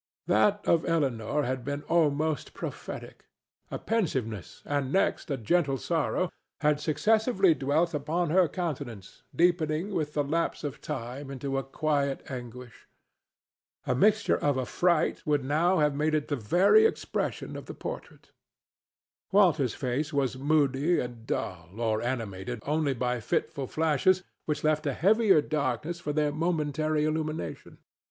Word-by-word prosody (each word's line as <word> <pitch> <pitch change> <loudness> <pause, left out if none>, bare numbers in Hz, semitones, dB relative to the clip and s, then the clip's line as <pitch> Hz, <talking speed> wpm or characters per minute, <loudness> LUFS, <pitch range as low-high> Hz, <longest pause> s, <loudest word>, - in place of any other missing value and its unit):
That 205 0 +2
of 165 -1 +4
Elinor 145 -4 0
had 130 -1 -2
been 145 +2 -4
almost 155 -3 +1
prophetic. - - -7 0.4
A - - -4
pensiveness, 130 - -2
and 140 -2 -1
next 195 - +1
a 140 - -1
gentle 135 +4 +1
sorrow, 170 +3 -1 0.3
had 150 -1 +3
successively 195 - +3
dwelt 155 +5 +1
upon 155 +3 -1
her 180 0 +5
countenance, 140 - -5
deepening 170 +2 +1
with 150 -4 -2
the 145 - +2
lapse 165 +4 -1
of 145 -2 -5
time 135 0 -5
into 135 0 -4
a 135 - 0
quiet 140 0 -1
anguish. 125 -1 -9 1.0
A - - +1
mixture 215 - +3
of 145 -2 +1
affright 165 +6 +1
would 145 -2 +2
now 165 +7 +2
have 150 -2 +3
made 155 +2 +1
it 150 -1 -1
the 145 - +1
very 180 - +5
expression - - -3
of - - -8
the - - -7
portrait. - - -8 1.0
Walter's 170 - +4
face 140 +4 -2
was 135 -3 0
moody 145 +3 +2
and 120 -2 -6
dull 90 +3 -4
or 110 -2 0
animated 120 -2 -3
only 150 -2 +1
by 125 0 -1
fitful 130 +4 -2
flashes 160 +5 +2 0.2
which 150 -1 -1
left 155 0 +1
a 140 - 0
heavier 195 - +4
darkness 150 +3 -2
for 150 - -3
their 150 0 +1
momentary 155 -1 0
illumination. 155 0 -3
150 Hz, 140 wpm, -28 LUFS, 130-165 Hz, 1.0 s, her